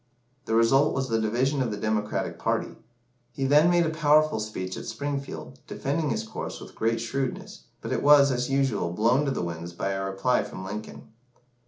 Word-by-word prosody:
The 110 - 0
result 135 +6 +4
was 135 -1 -1
the 115 -1 +1
division 130 +6 +1
of 125 - 0
the 105 - -4
Democratic 105 0 -2
party. - - -1 0.6
He 135 - -2
then 150 +5 +5
made 175 -1 +3
a 160 - 0
powerful 155 -3 +3
speech 95 -4 -4
at - - -7
Springfield, 140 -1 -5
defending 150 +2 -2
his 110 -3 -1
course 110 - -6
with - - -11
great 115 +1 0
shrewdness, 130 +3 -4 0.2
but - - -5
it - - -1
was, 145 -1 +6
as 125 0 -1
usual, 135 -10 0
blown 120 +9 +2
to 140 - 0
the 130 - -2
winds 85 0 -5
by 95 - -3
a 95 0 -2
reply 95 +6 +1
from 95 - -8
Lincoln. 105 +3 -7
125 Hz, 190 wpm, -26 LUFS, 105-140 Hz, 0.6 s, was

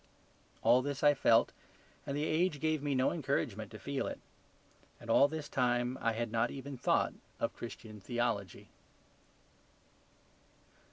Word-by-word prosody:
All 125 - +6
this 140 +1 -4
I 145 - +7
felt 115 -4 +4 0.6
and 140 - -2
the 150 - 0
age 160 -1 +1
gave 155 -1 0
me 145 -1 -1
no 130 +1 +3
encouragement 125 - -2
to 110 - -9
feel 140 +4 -3
it. - - -5 0.8
And 115 - -5
all 140 - +6
this 155 0 -5
time 125 -1 +1
I 115 - +1
had 115 0 -3
not 115 +1 +1
even 140 0 -7
thought 125 - +1 0.3
of - - -1
Christian 110 -2 -8
theology. 115 -4 -2
130 Hz, 145 wpm, -33 LUFS, 115-145 Hz, 0.8 s, I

